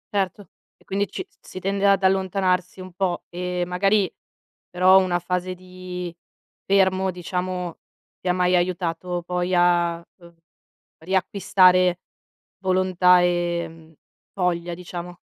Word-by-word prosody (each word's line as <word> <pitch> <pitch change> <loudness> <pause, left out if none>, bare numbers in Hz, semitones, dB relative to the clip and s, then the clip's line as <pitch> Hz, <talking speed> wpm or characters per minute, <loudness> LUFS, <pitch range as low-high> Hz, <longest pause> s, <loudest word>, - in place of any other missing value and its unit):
Certo 195 0 -1 0.3
e - - -27
quindi 200 +1 -1
ci 375 - -6 0.2
si 185 - -9
tende 195 +1 0
ad 195 -1 +3
allontanarsi 190 -1 +1
un 185 -1 -10
po' 180 -2 -1
e 180 0 -3
magari 195 +2 +1 0.6
però 185 +1 +6
una 185 -2 +1
fase 180 +1 -3
di 180 -1 -8 0.5
fermo, 190 -1 +3
diciamo, 180 0 -4 0.4
ti - - -7
ha 180 - +3
mai 180 0 +2
aiutato 175 0 -1
poi 180 +1 -1
a 175 -1 +3 0.2
uhm, 170 -2 -17 0.6
riacquistare 185 0 +3 0.6
volontà 185 -1 +4
e 170 -2 -2 0.4
voglia, 175 -2 -1
diciamo? 175 0 -8
180 Hz, 120 wpm, -23 LUFS, 175-185 Hz, 0.6 s, però